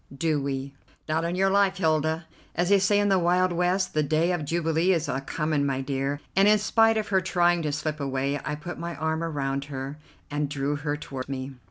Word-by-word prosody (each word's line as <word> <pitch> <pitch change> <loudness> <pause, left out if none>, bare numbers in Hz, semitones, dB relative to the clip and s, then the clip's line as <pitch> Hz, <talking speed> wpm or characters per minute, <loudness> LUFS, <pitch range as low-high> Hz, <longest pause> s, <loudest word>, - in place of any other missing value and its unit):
do 155 -1 +1
we?" 135 0 -3 0.3
"Not 160 +1 0
on 170 +1 -1
your 195 +1 +2
life, 195 -1 +3
Hilda, 160 -1 +1 0.3
as 175 +2 +1
they 200 -1 +6
say 205 +2 +3
in 205 0 +2
the 190 -1 +4
Wild 180 +1 +2
West. 180 +2 +1
The 155 - +2
day 155 +4 +1
of 175 -3 -1
jubilee 165 +3 +1
is 165 -2 0
a 135 -1 -2
coming 150 +1 -1
my 135 -1 0
dear," 135 +1 -2 0.2
and, 195 +1 +5
in 215 0 +6
spite 225 +1 +3
of 215 -1 -2
her 190 -2 +3
trying 175 -1 +2
to 150 -2 -1
slip 150 +1 -3
away, 140 +1 -1
I 150 - -2
put 160 +4 -7
my 170 0 -4
arm 160 +2 -1
around 140 -4 -2
her 140 +1 -6 0.3
and 145 -1 -1
drew 145 0 -1
her 145 0 -2
toward 135 -3 -7
me. 135 0 -4
160 Hz, 220 wpm, -26 LUFS, 140-180 Hz, 0.3 s, they